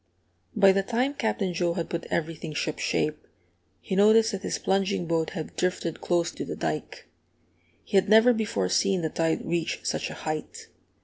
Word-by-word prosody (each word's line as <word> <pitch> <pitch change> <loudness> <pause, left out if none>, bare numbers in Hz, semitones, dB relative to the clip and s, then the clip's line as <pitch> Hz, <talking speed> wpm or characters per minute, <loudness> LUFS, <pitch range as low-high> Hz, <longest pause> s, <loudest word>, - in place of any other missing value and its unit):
By 195 -1 +6
the 195 +1 +2
time 245 +7 0
Captain 215 -8 -1
Joe 170 0 0
had 170 - -2
put 170 -1 -3
everything 160 -1 -3
shipshape, 155 0 -1 0.6
he 190 - -4
noticed 220 +3 +5
that 195 -2 -4
his - - -2
plunging 195 -1 0
boat 165 -1 0
had 160 - -6
drifted 180 -3 -2
close 170 -1 +1
to - - -6
the - - -5
dike. - - -4 0.8
He 200 - 0
had 190 - +3
never 225 +3 +7
before 210 - -1
seen 185 - +1
the 160 - 0
tide 165 +1 -1
reach 170 -1 -2
such - - -2
a - - -7
height. 155 -1 -5
180 Hz, 175 wpm, -26 LUFS, 165-200 Hz, 0.8 s, never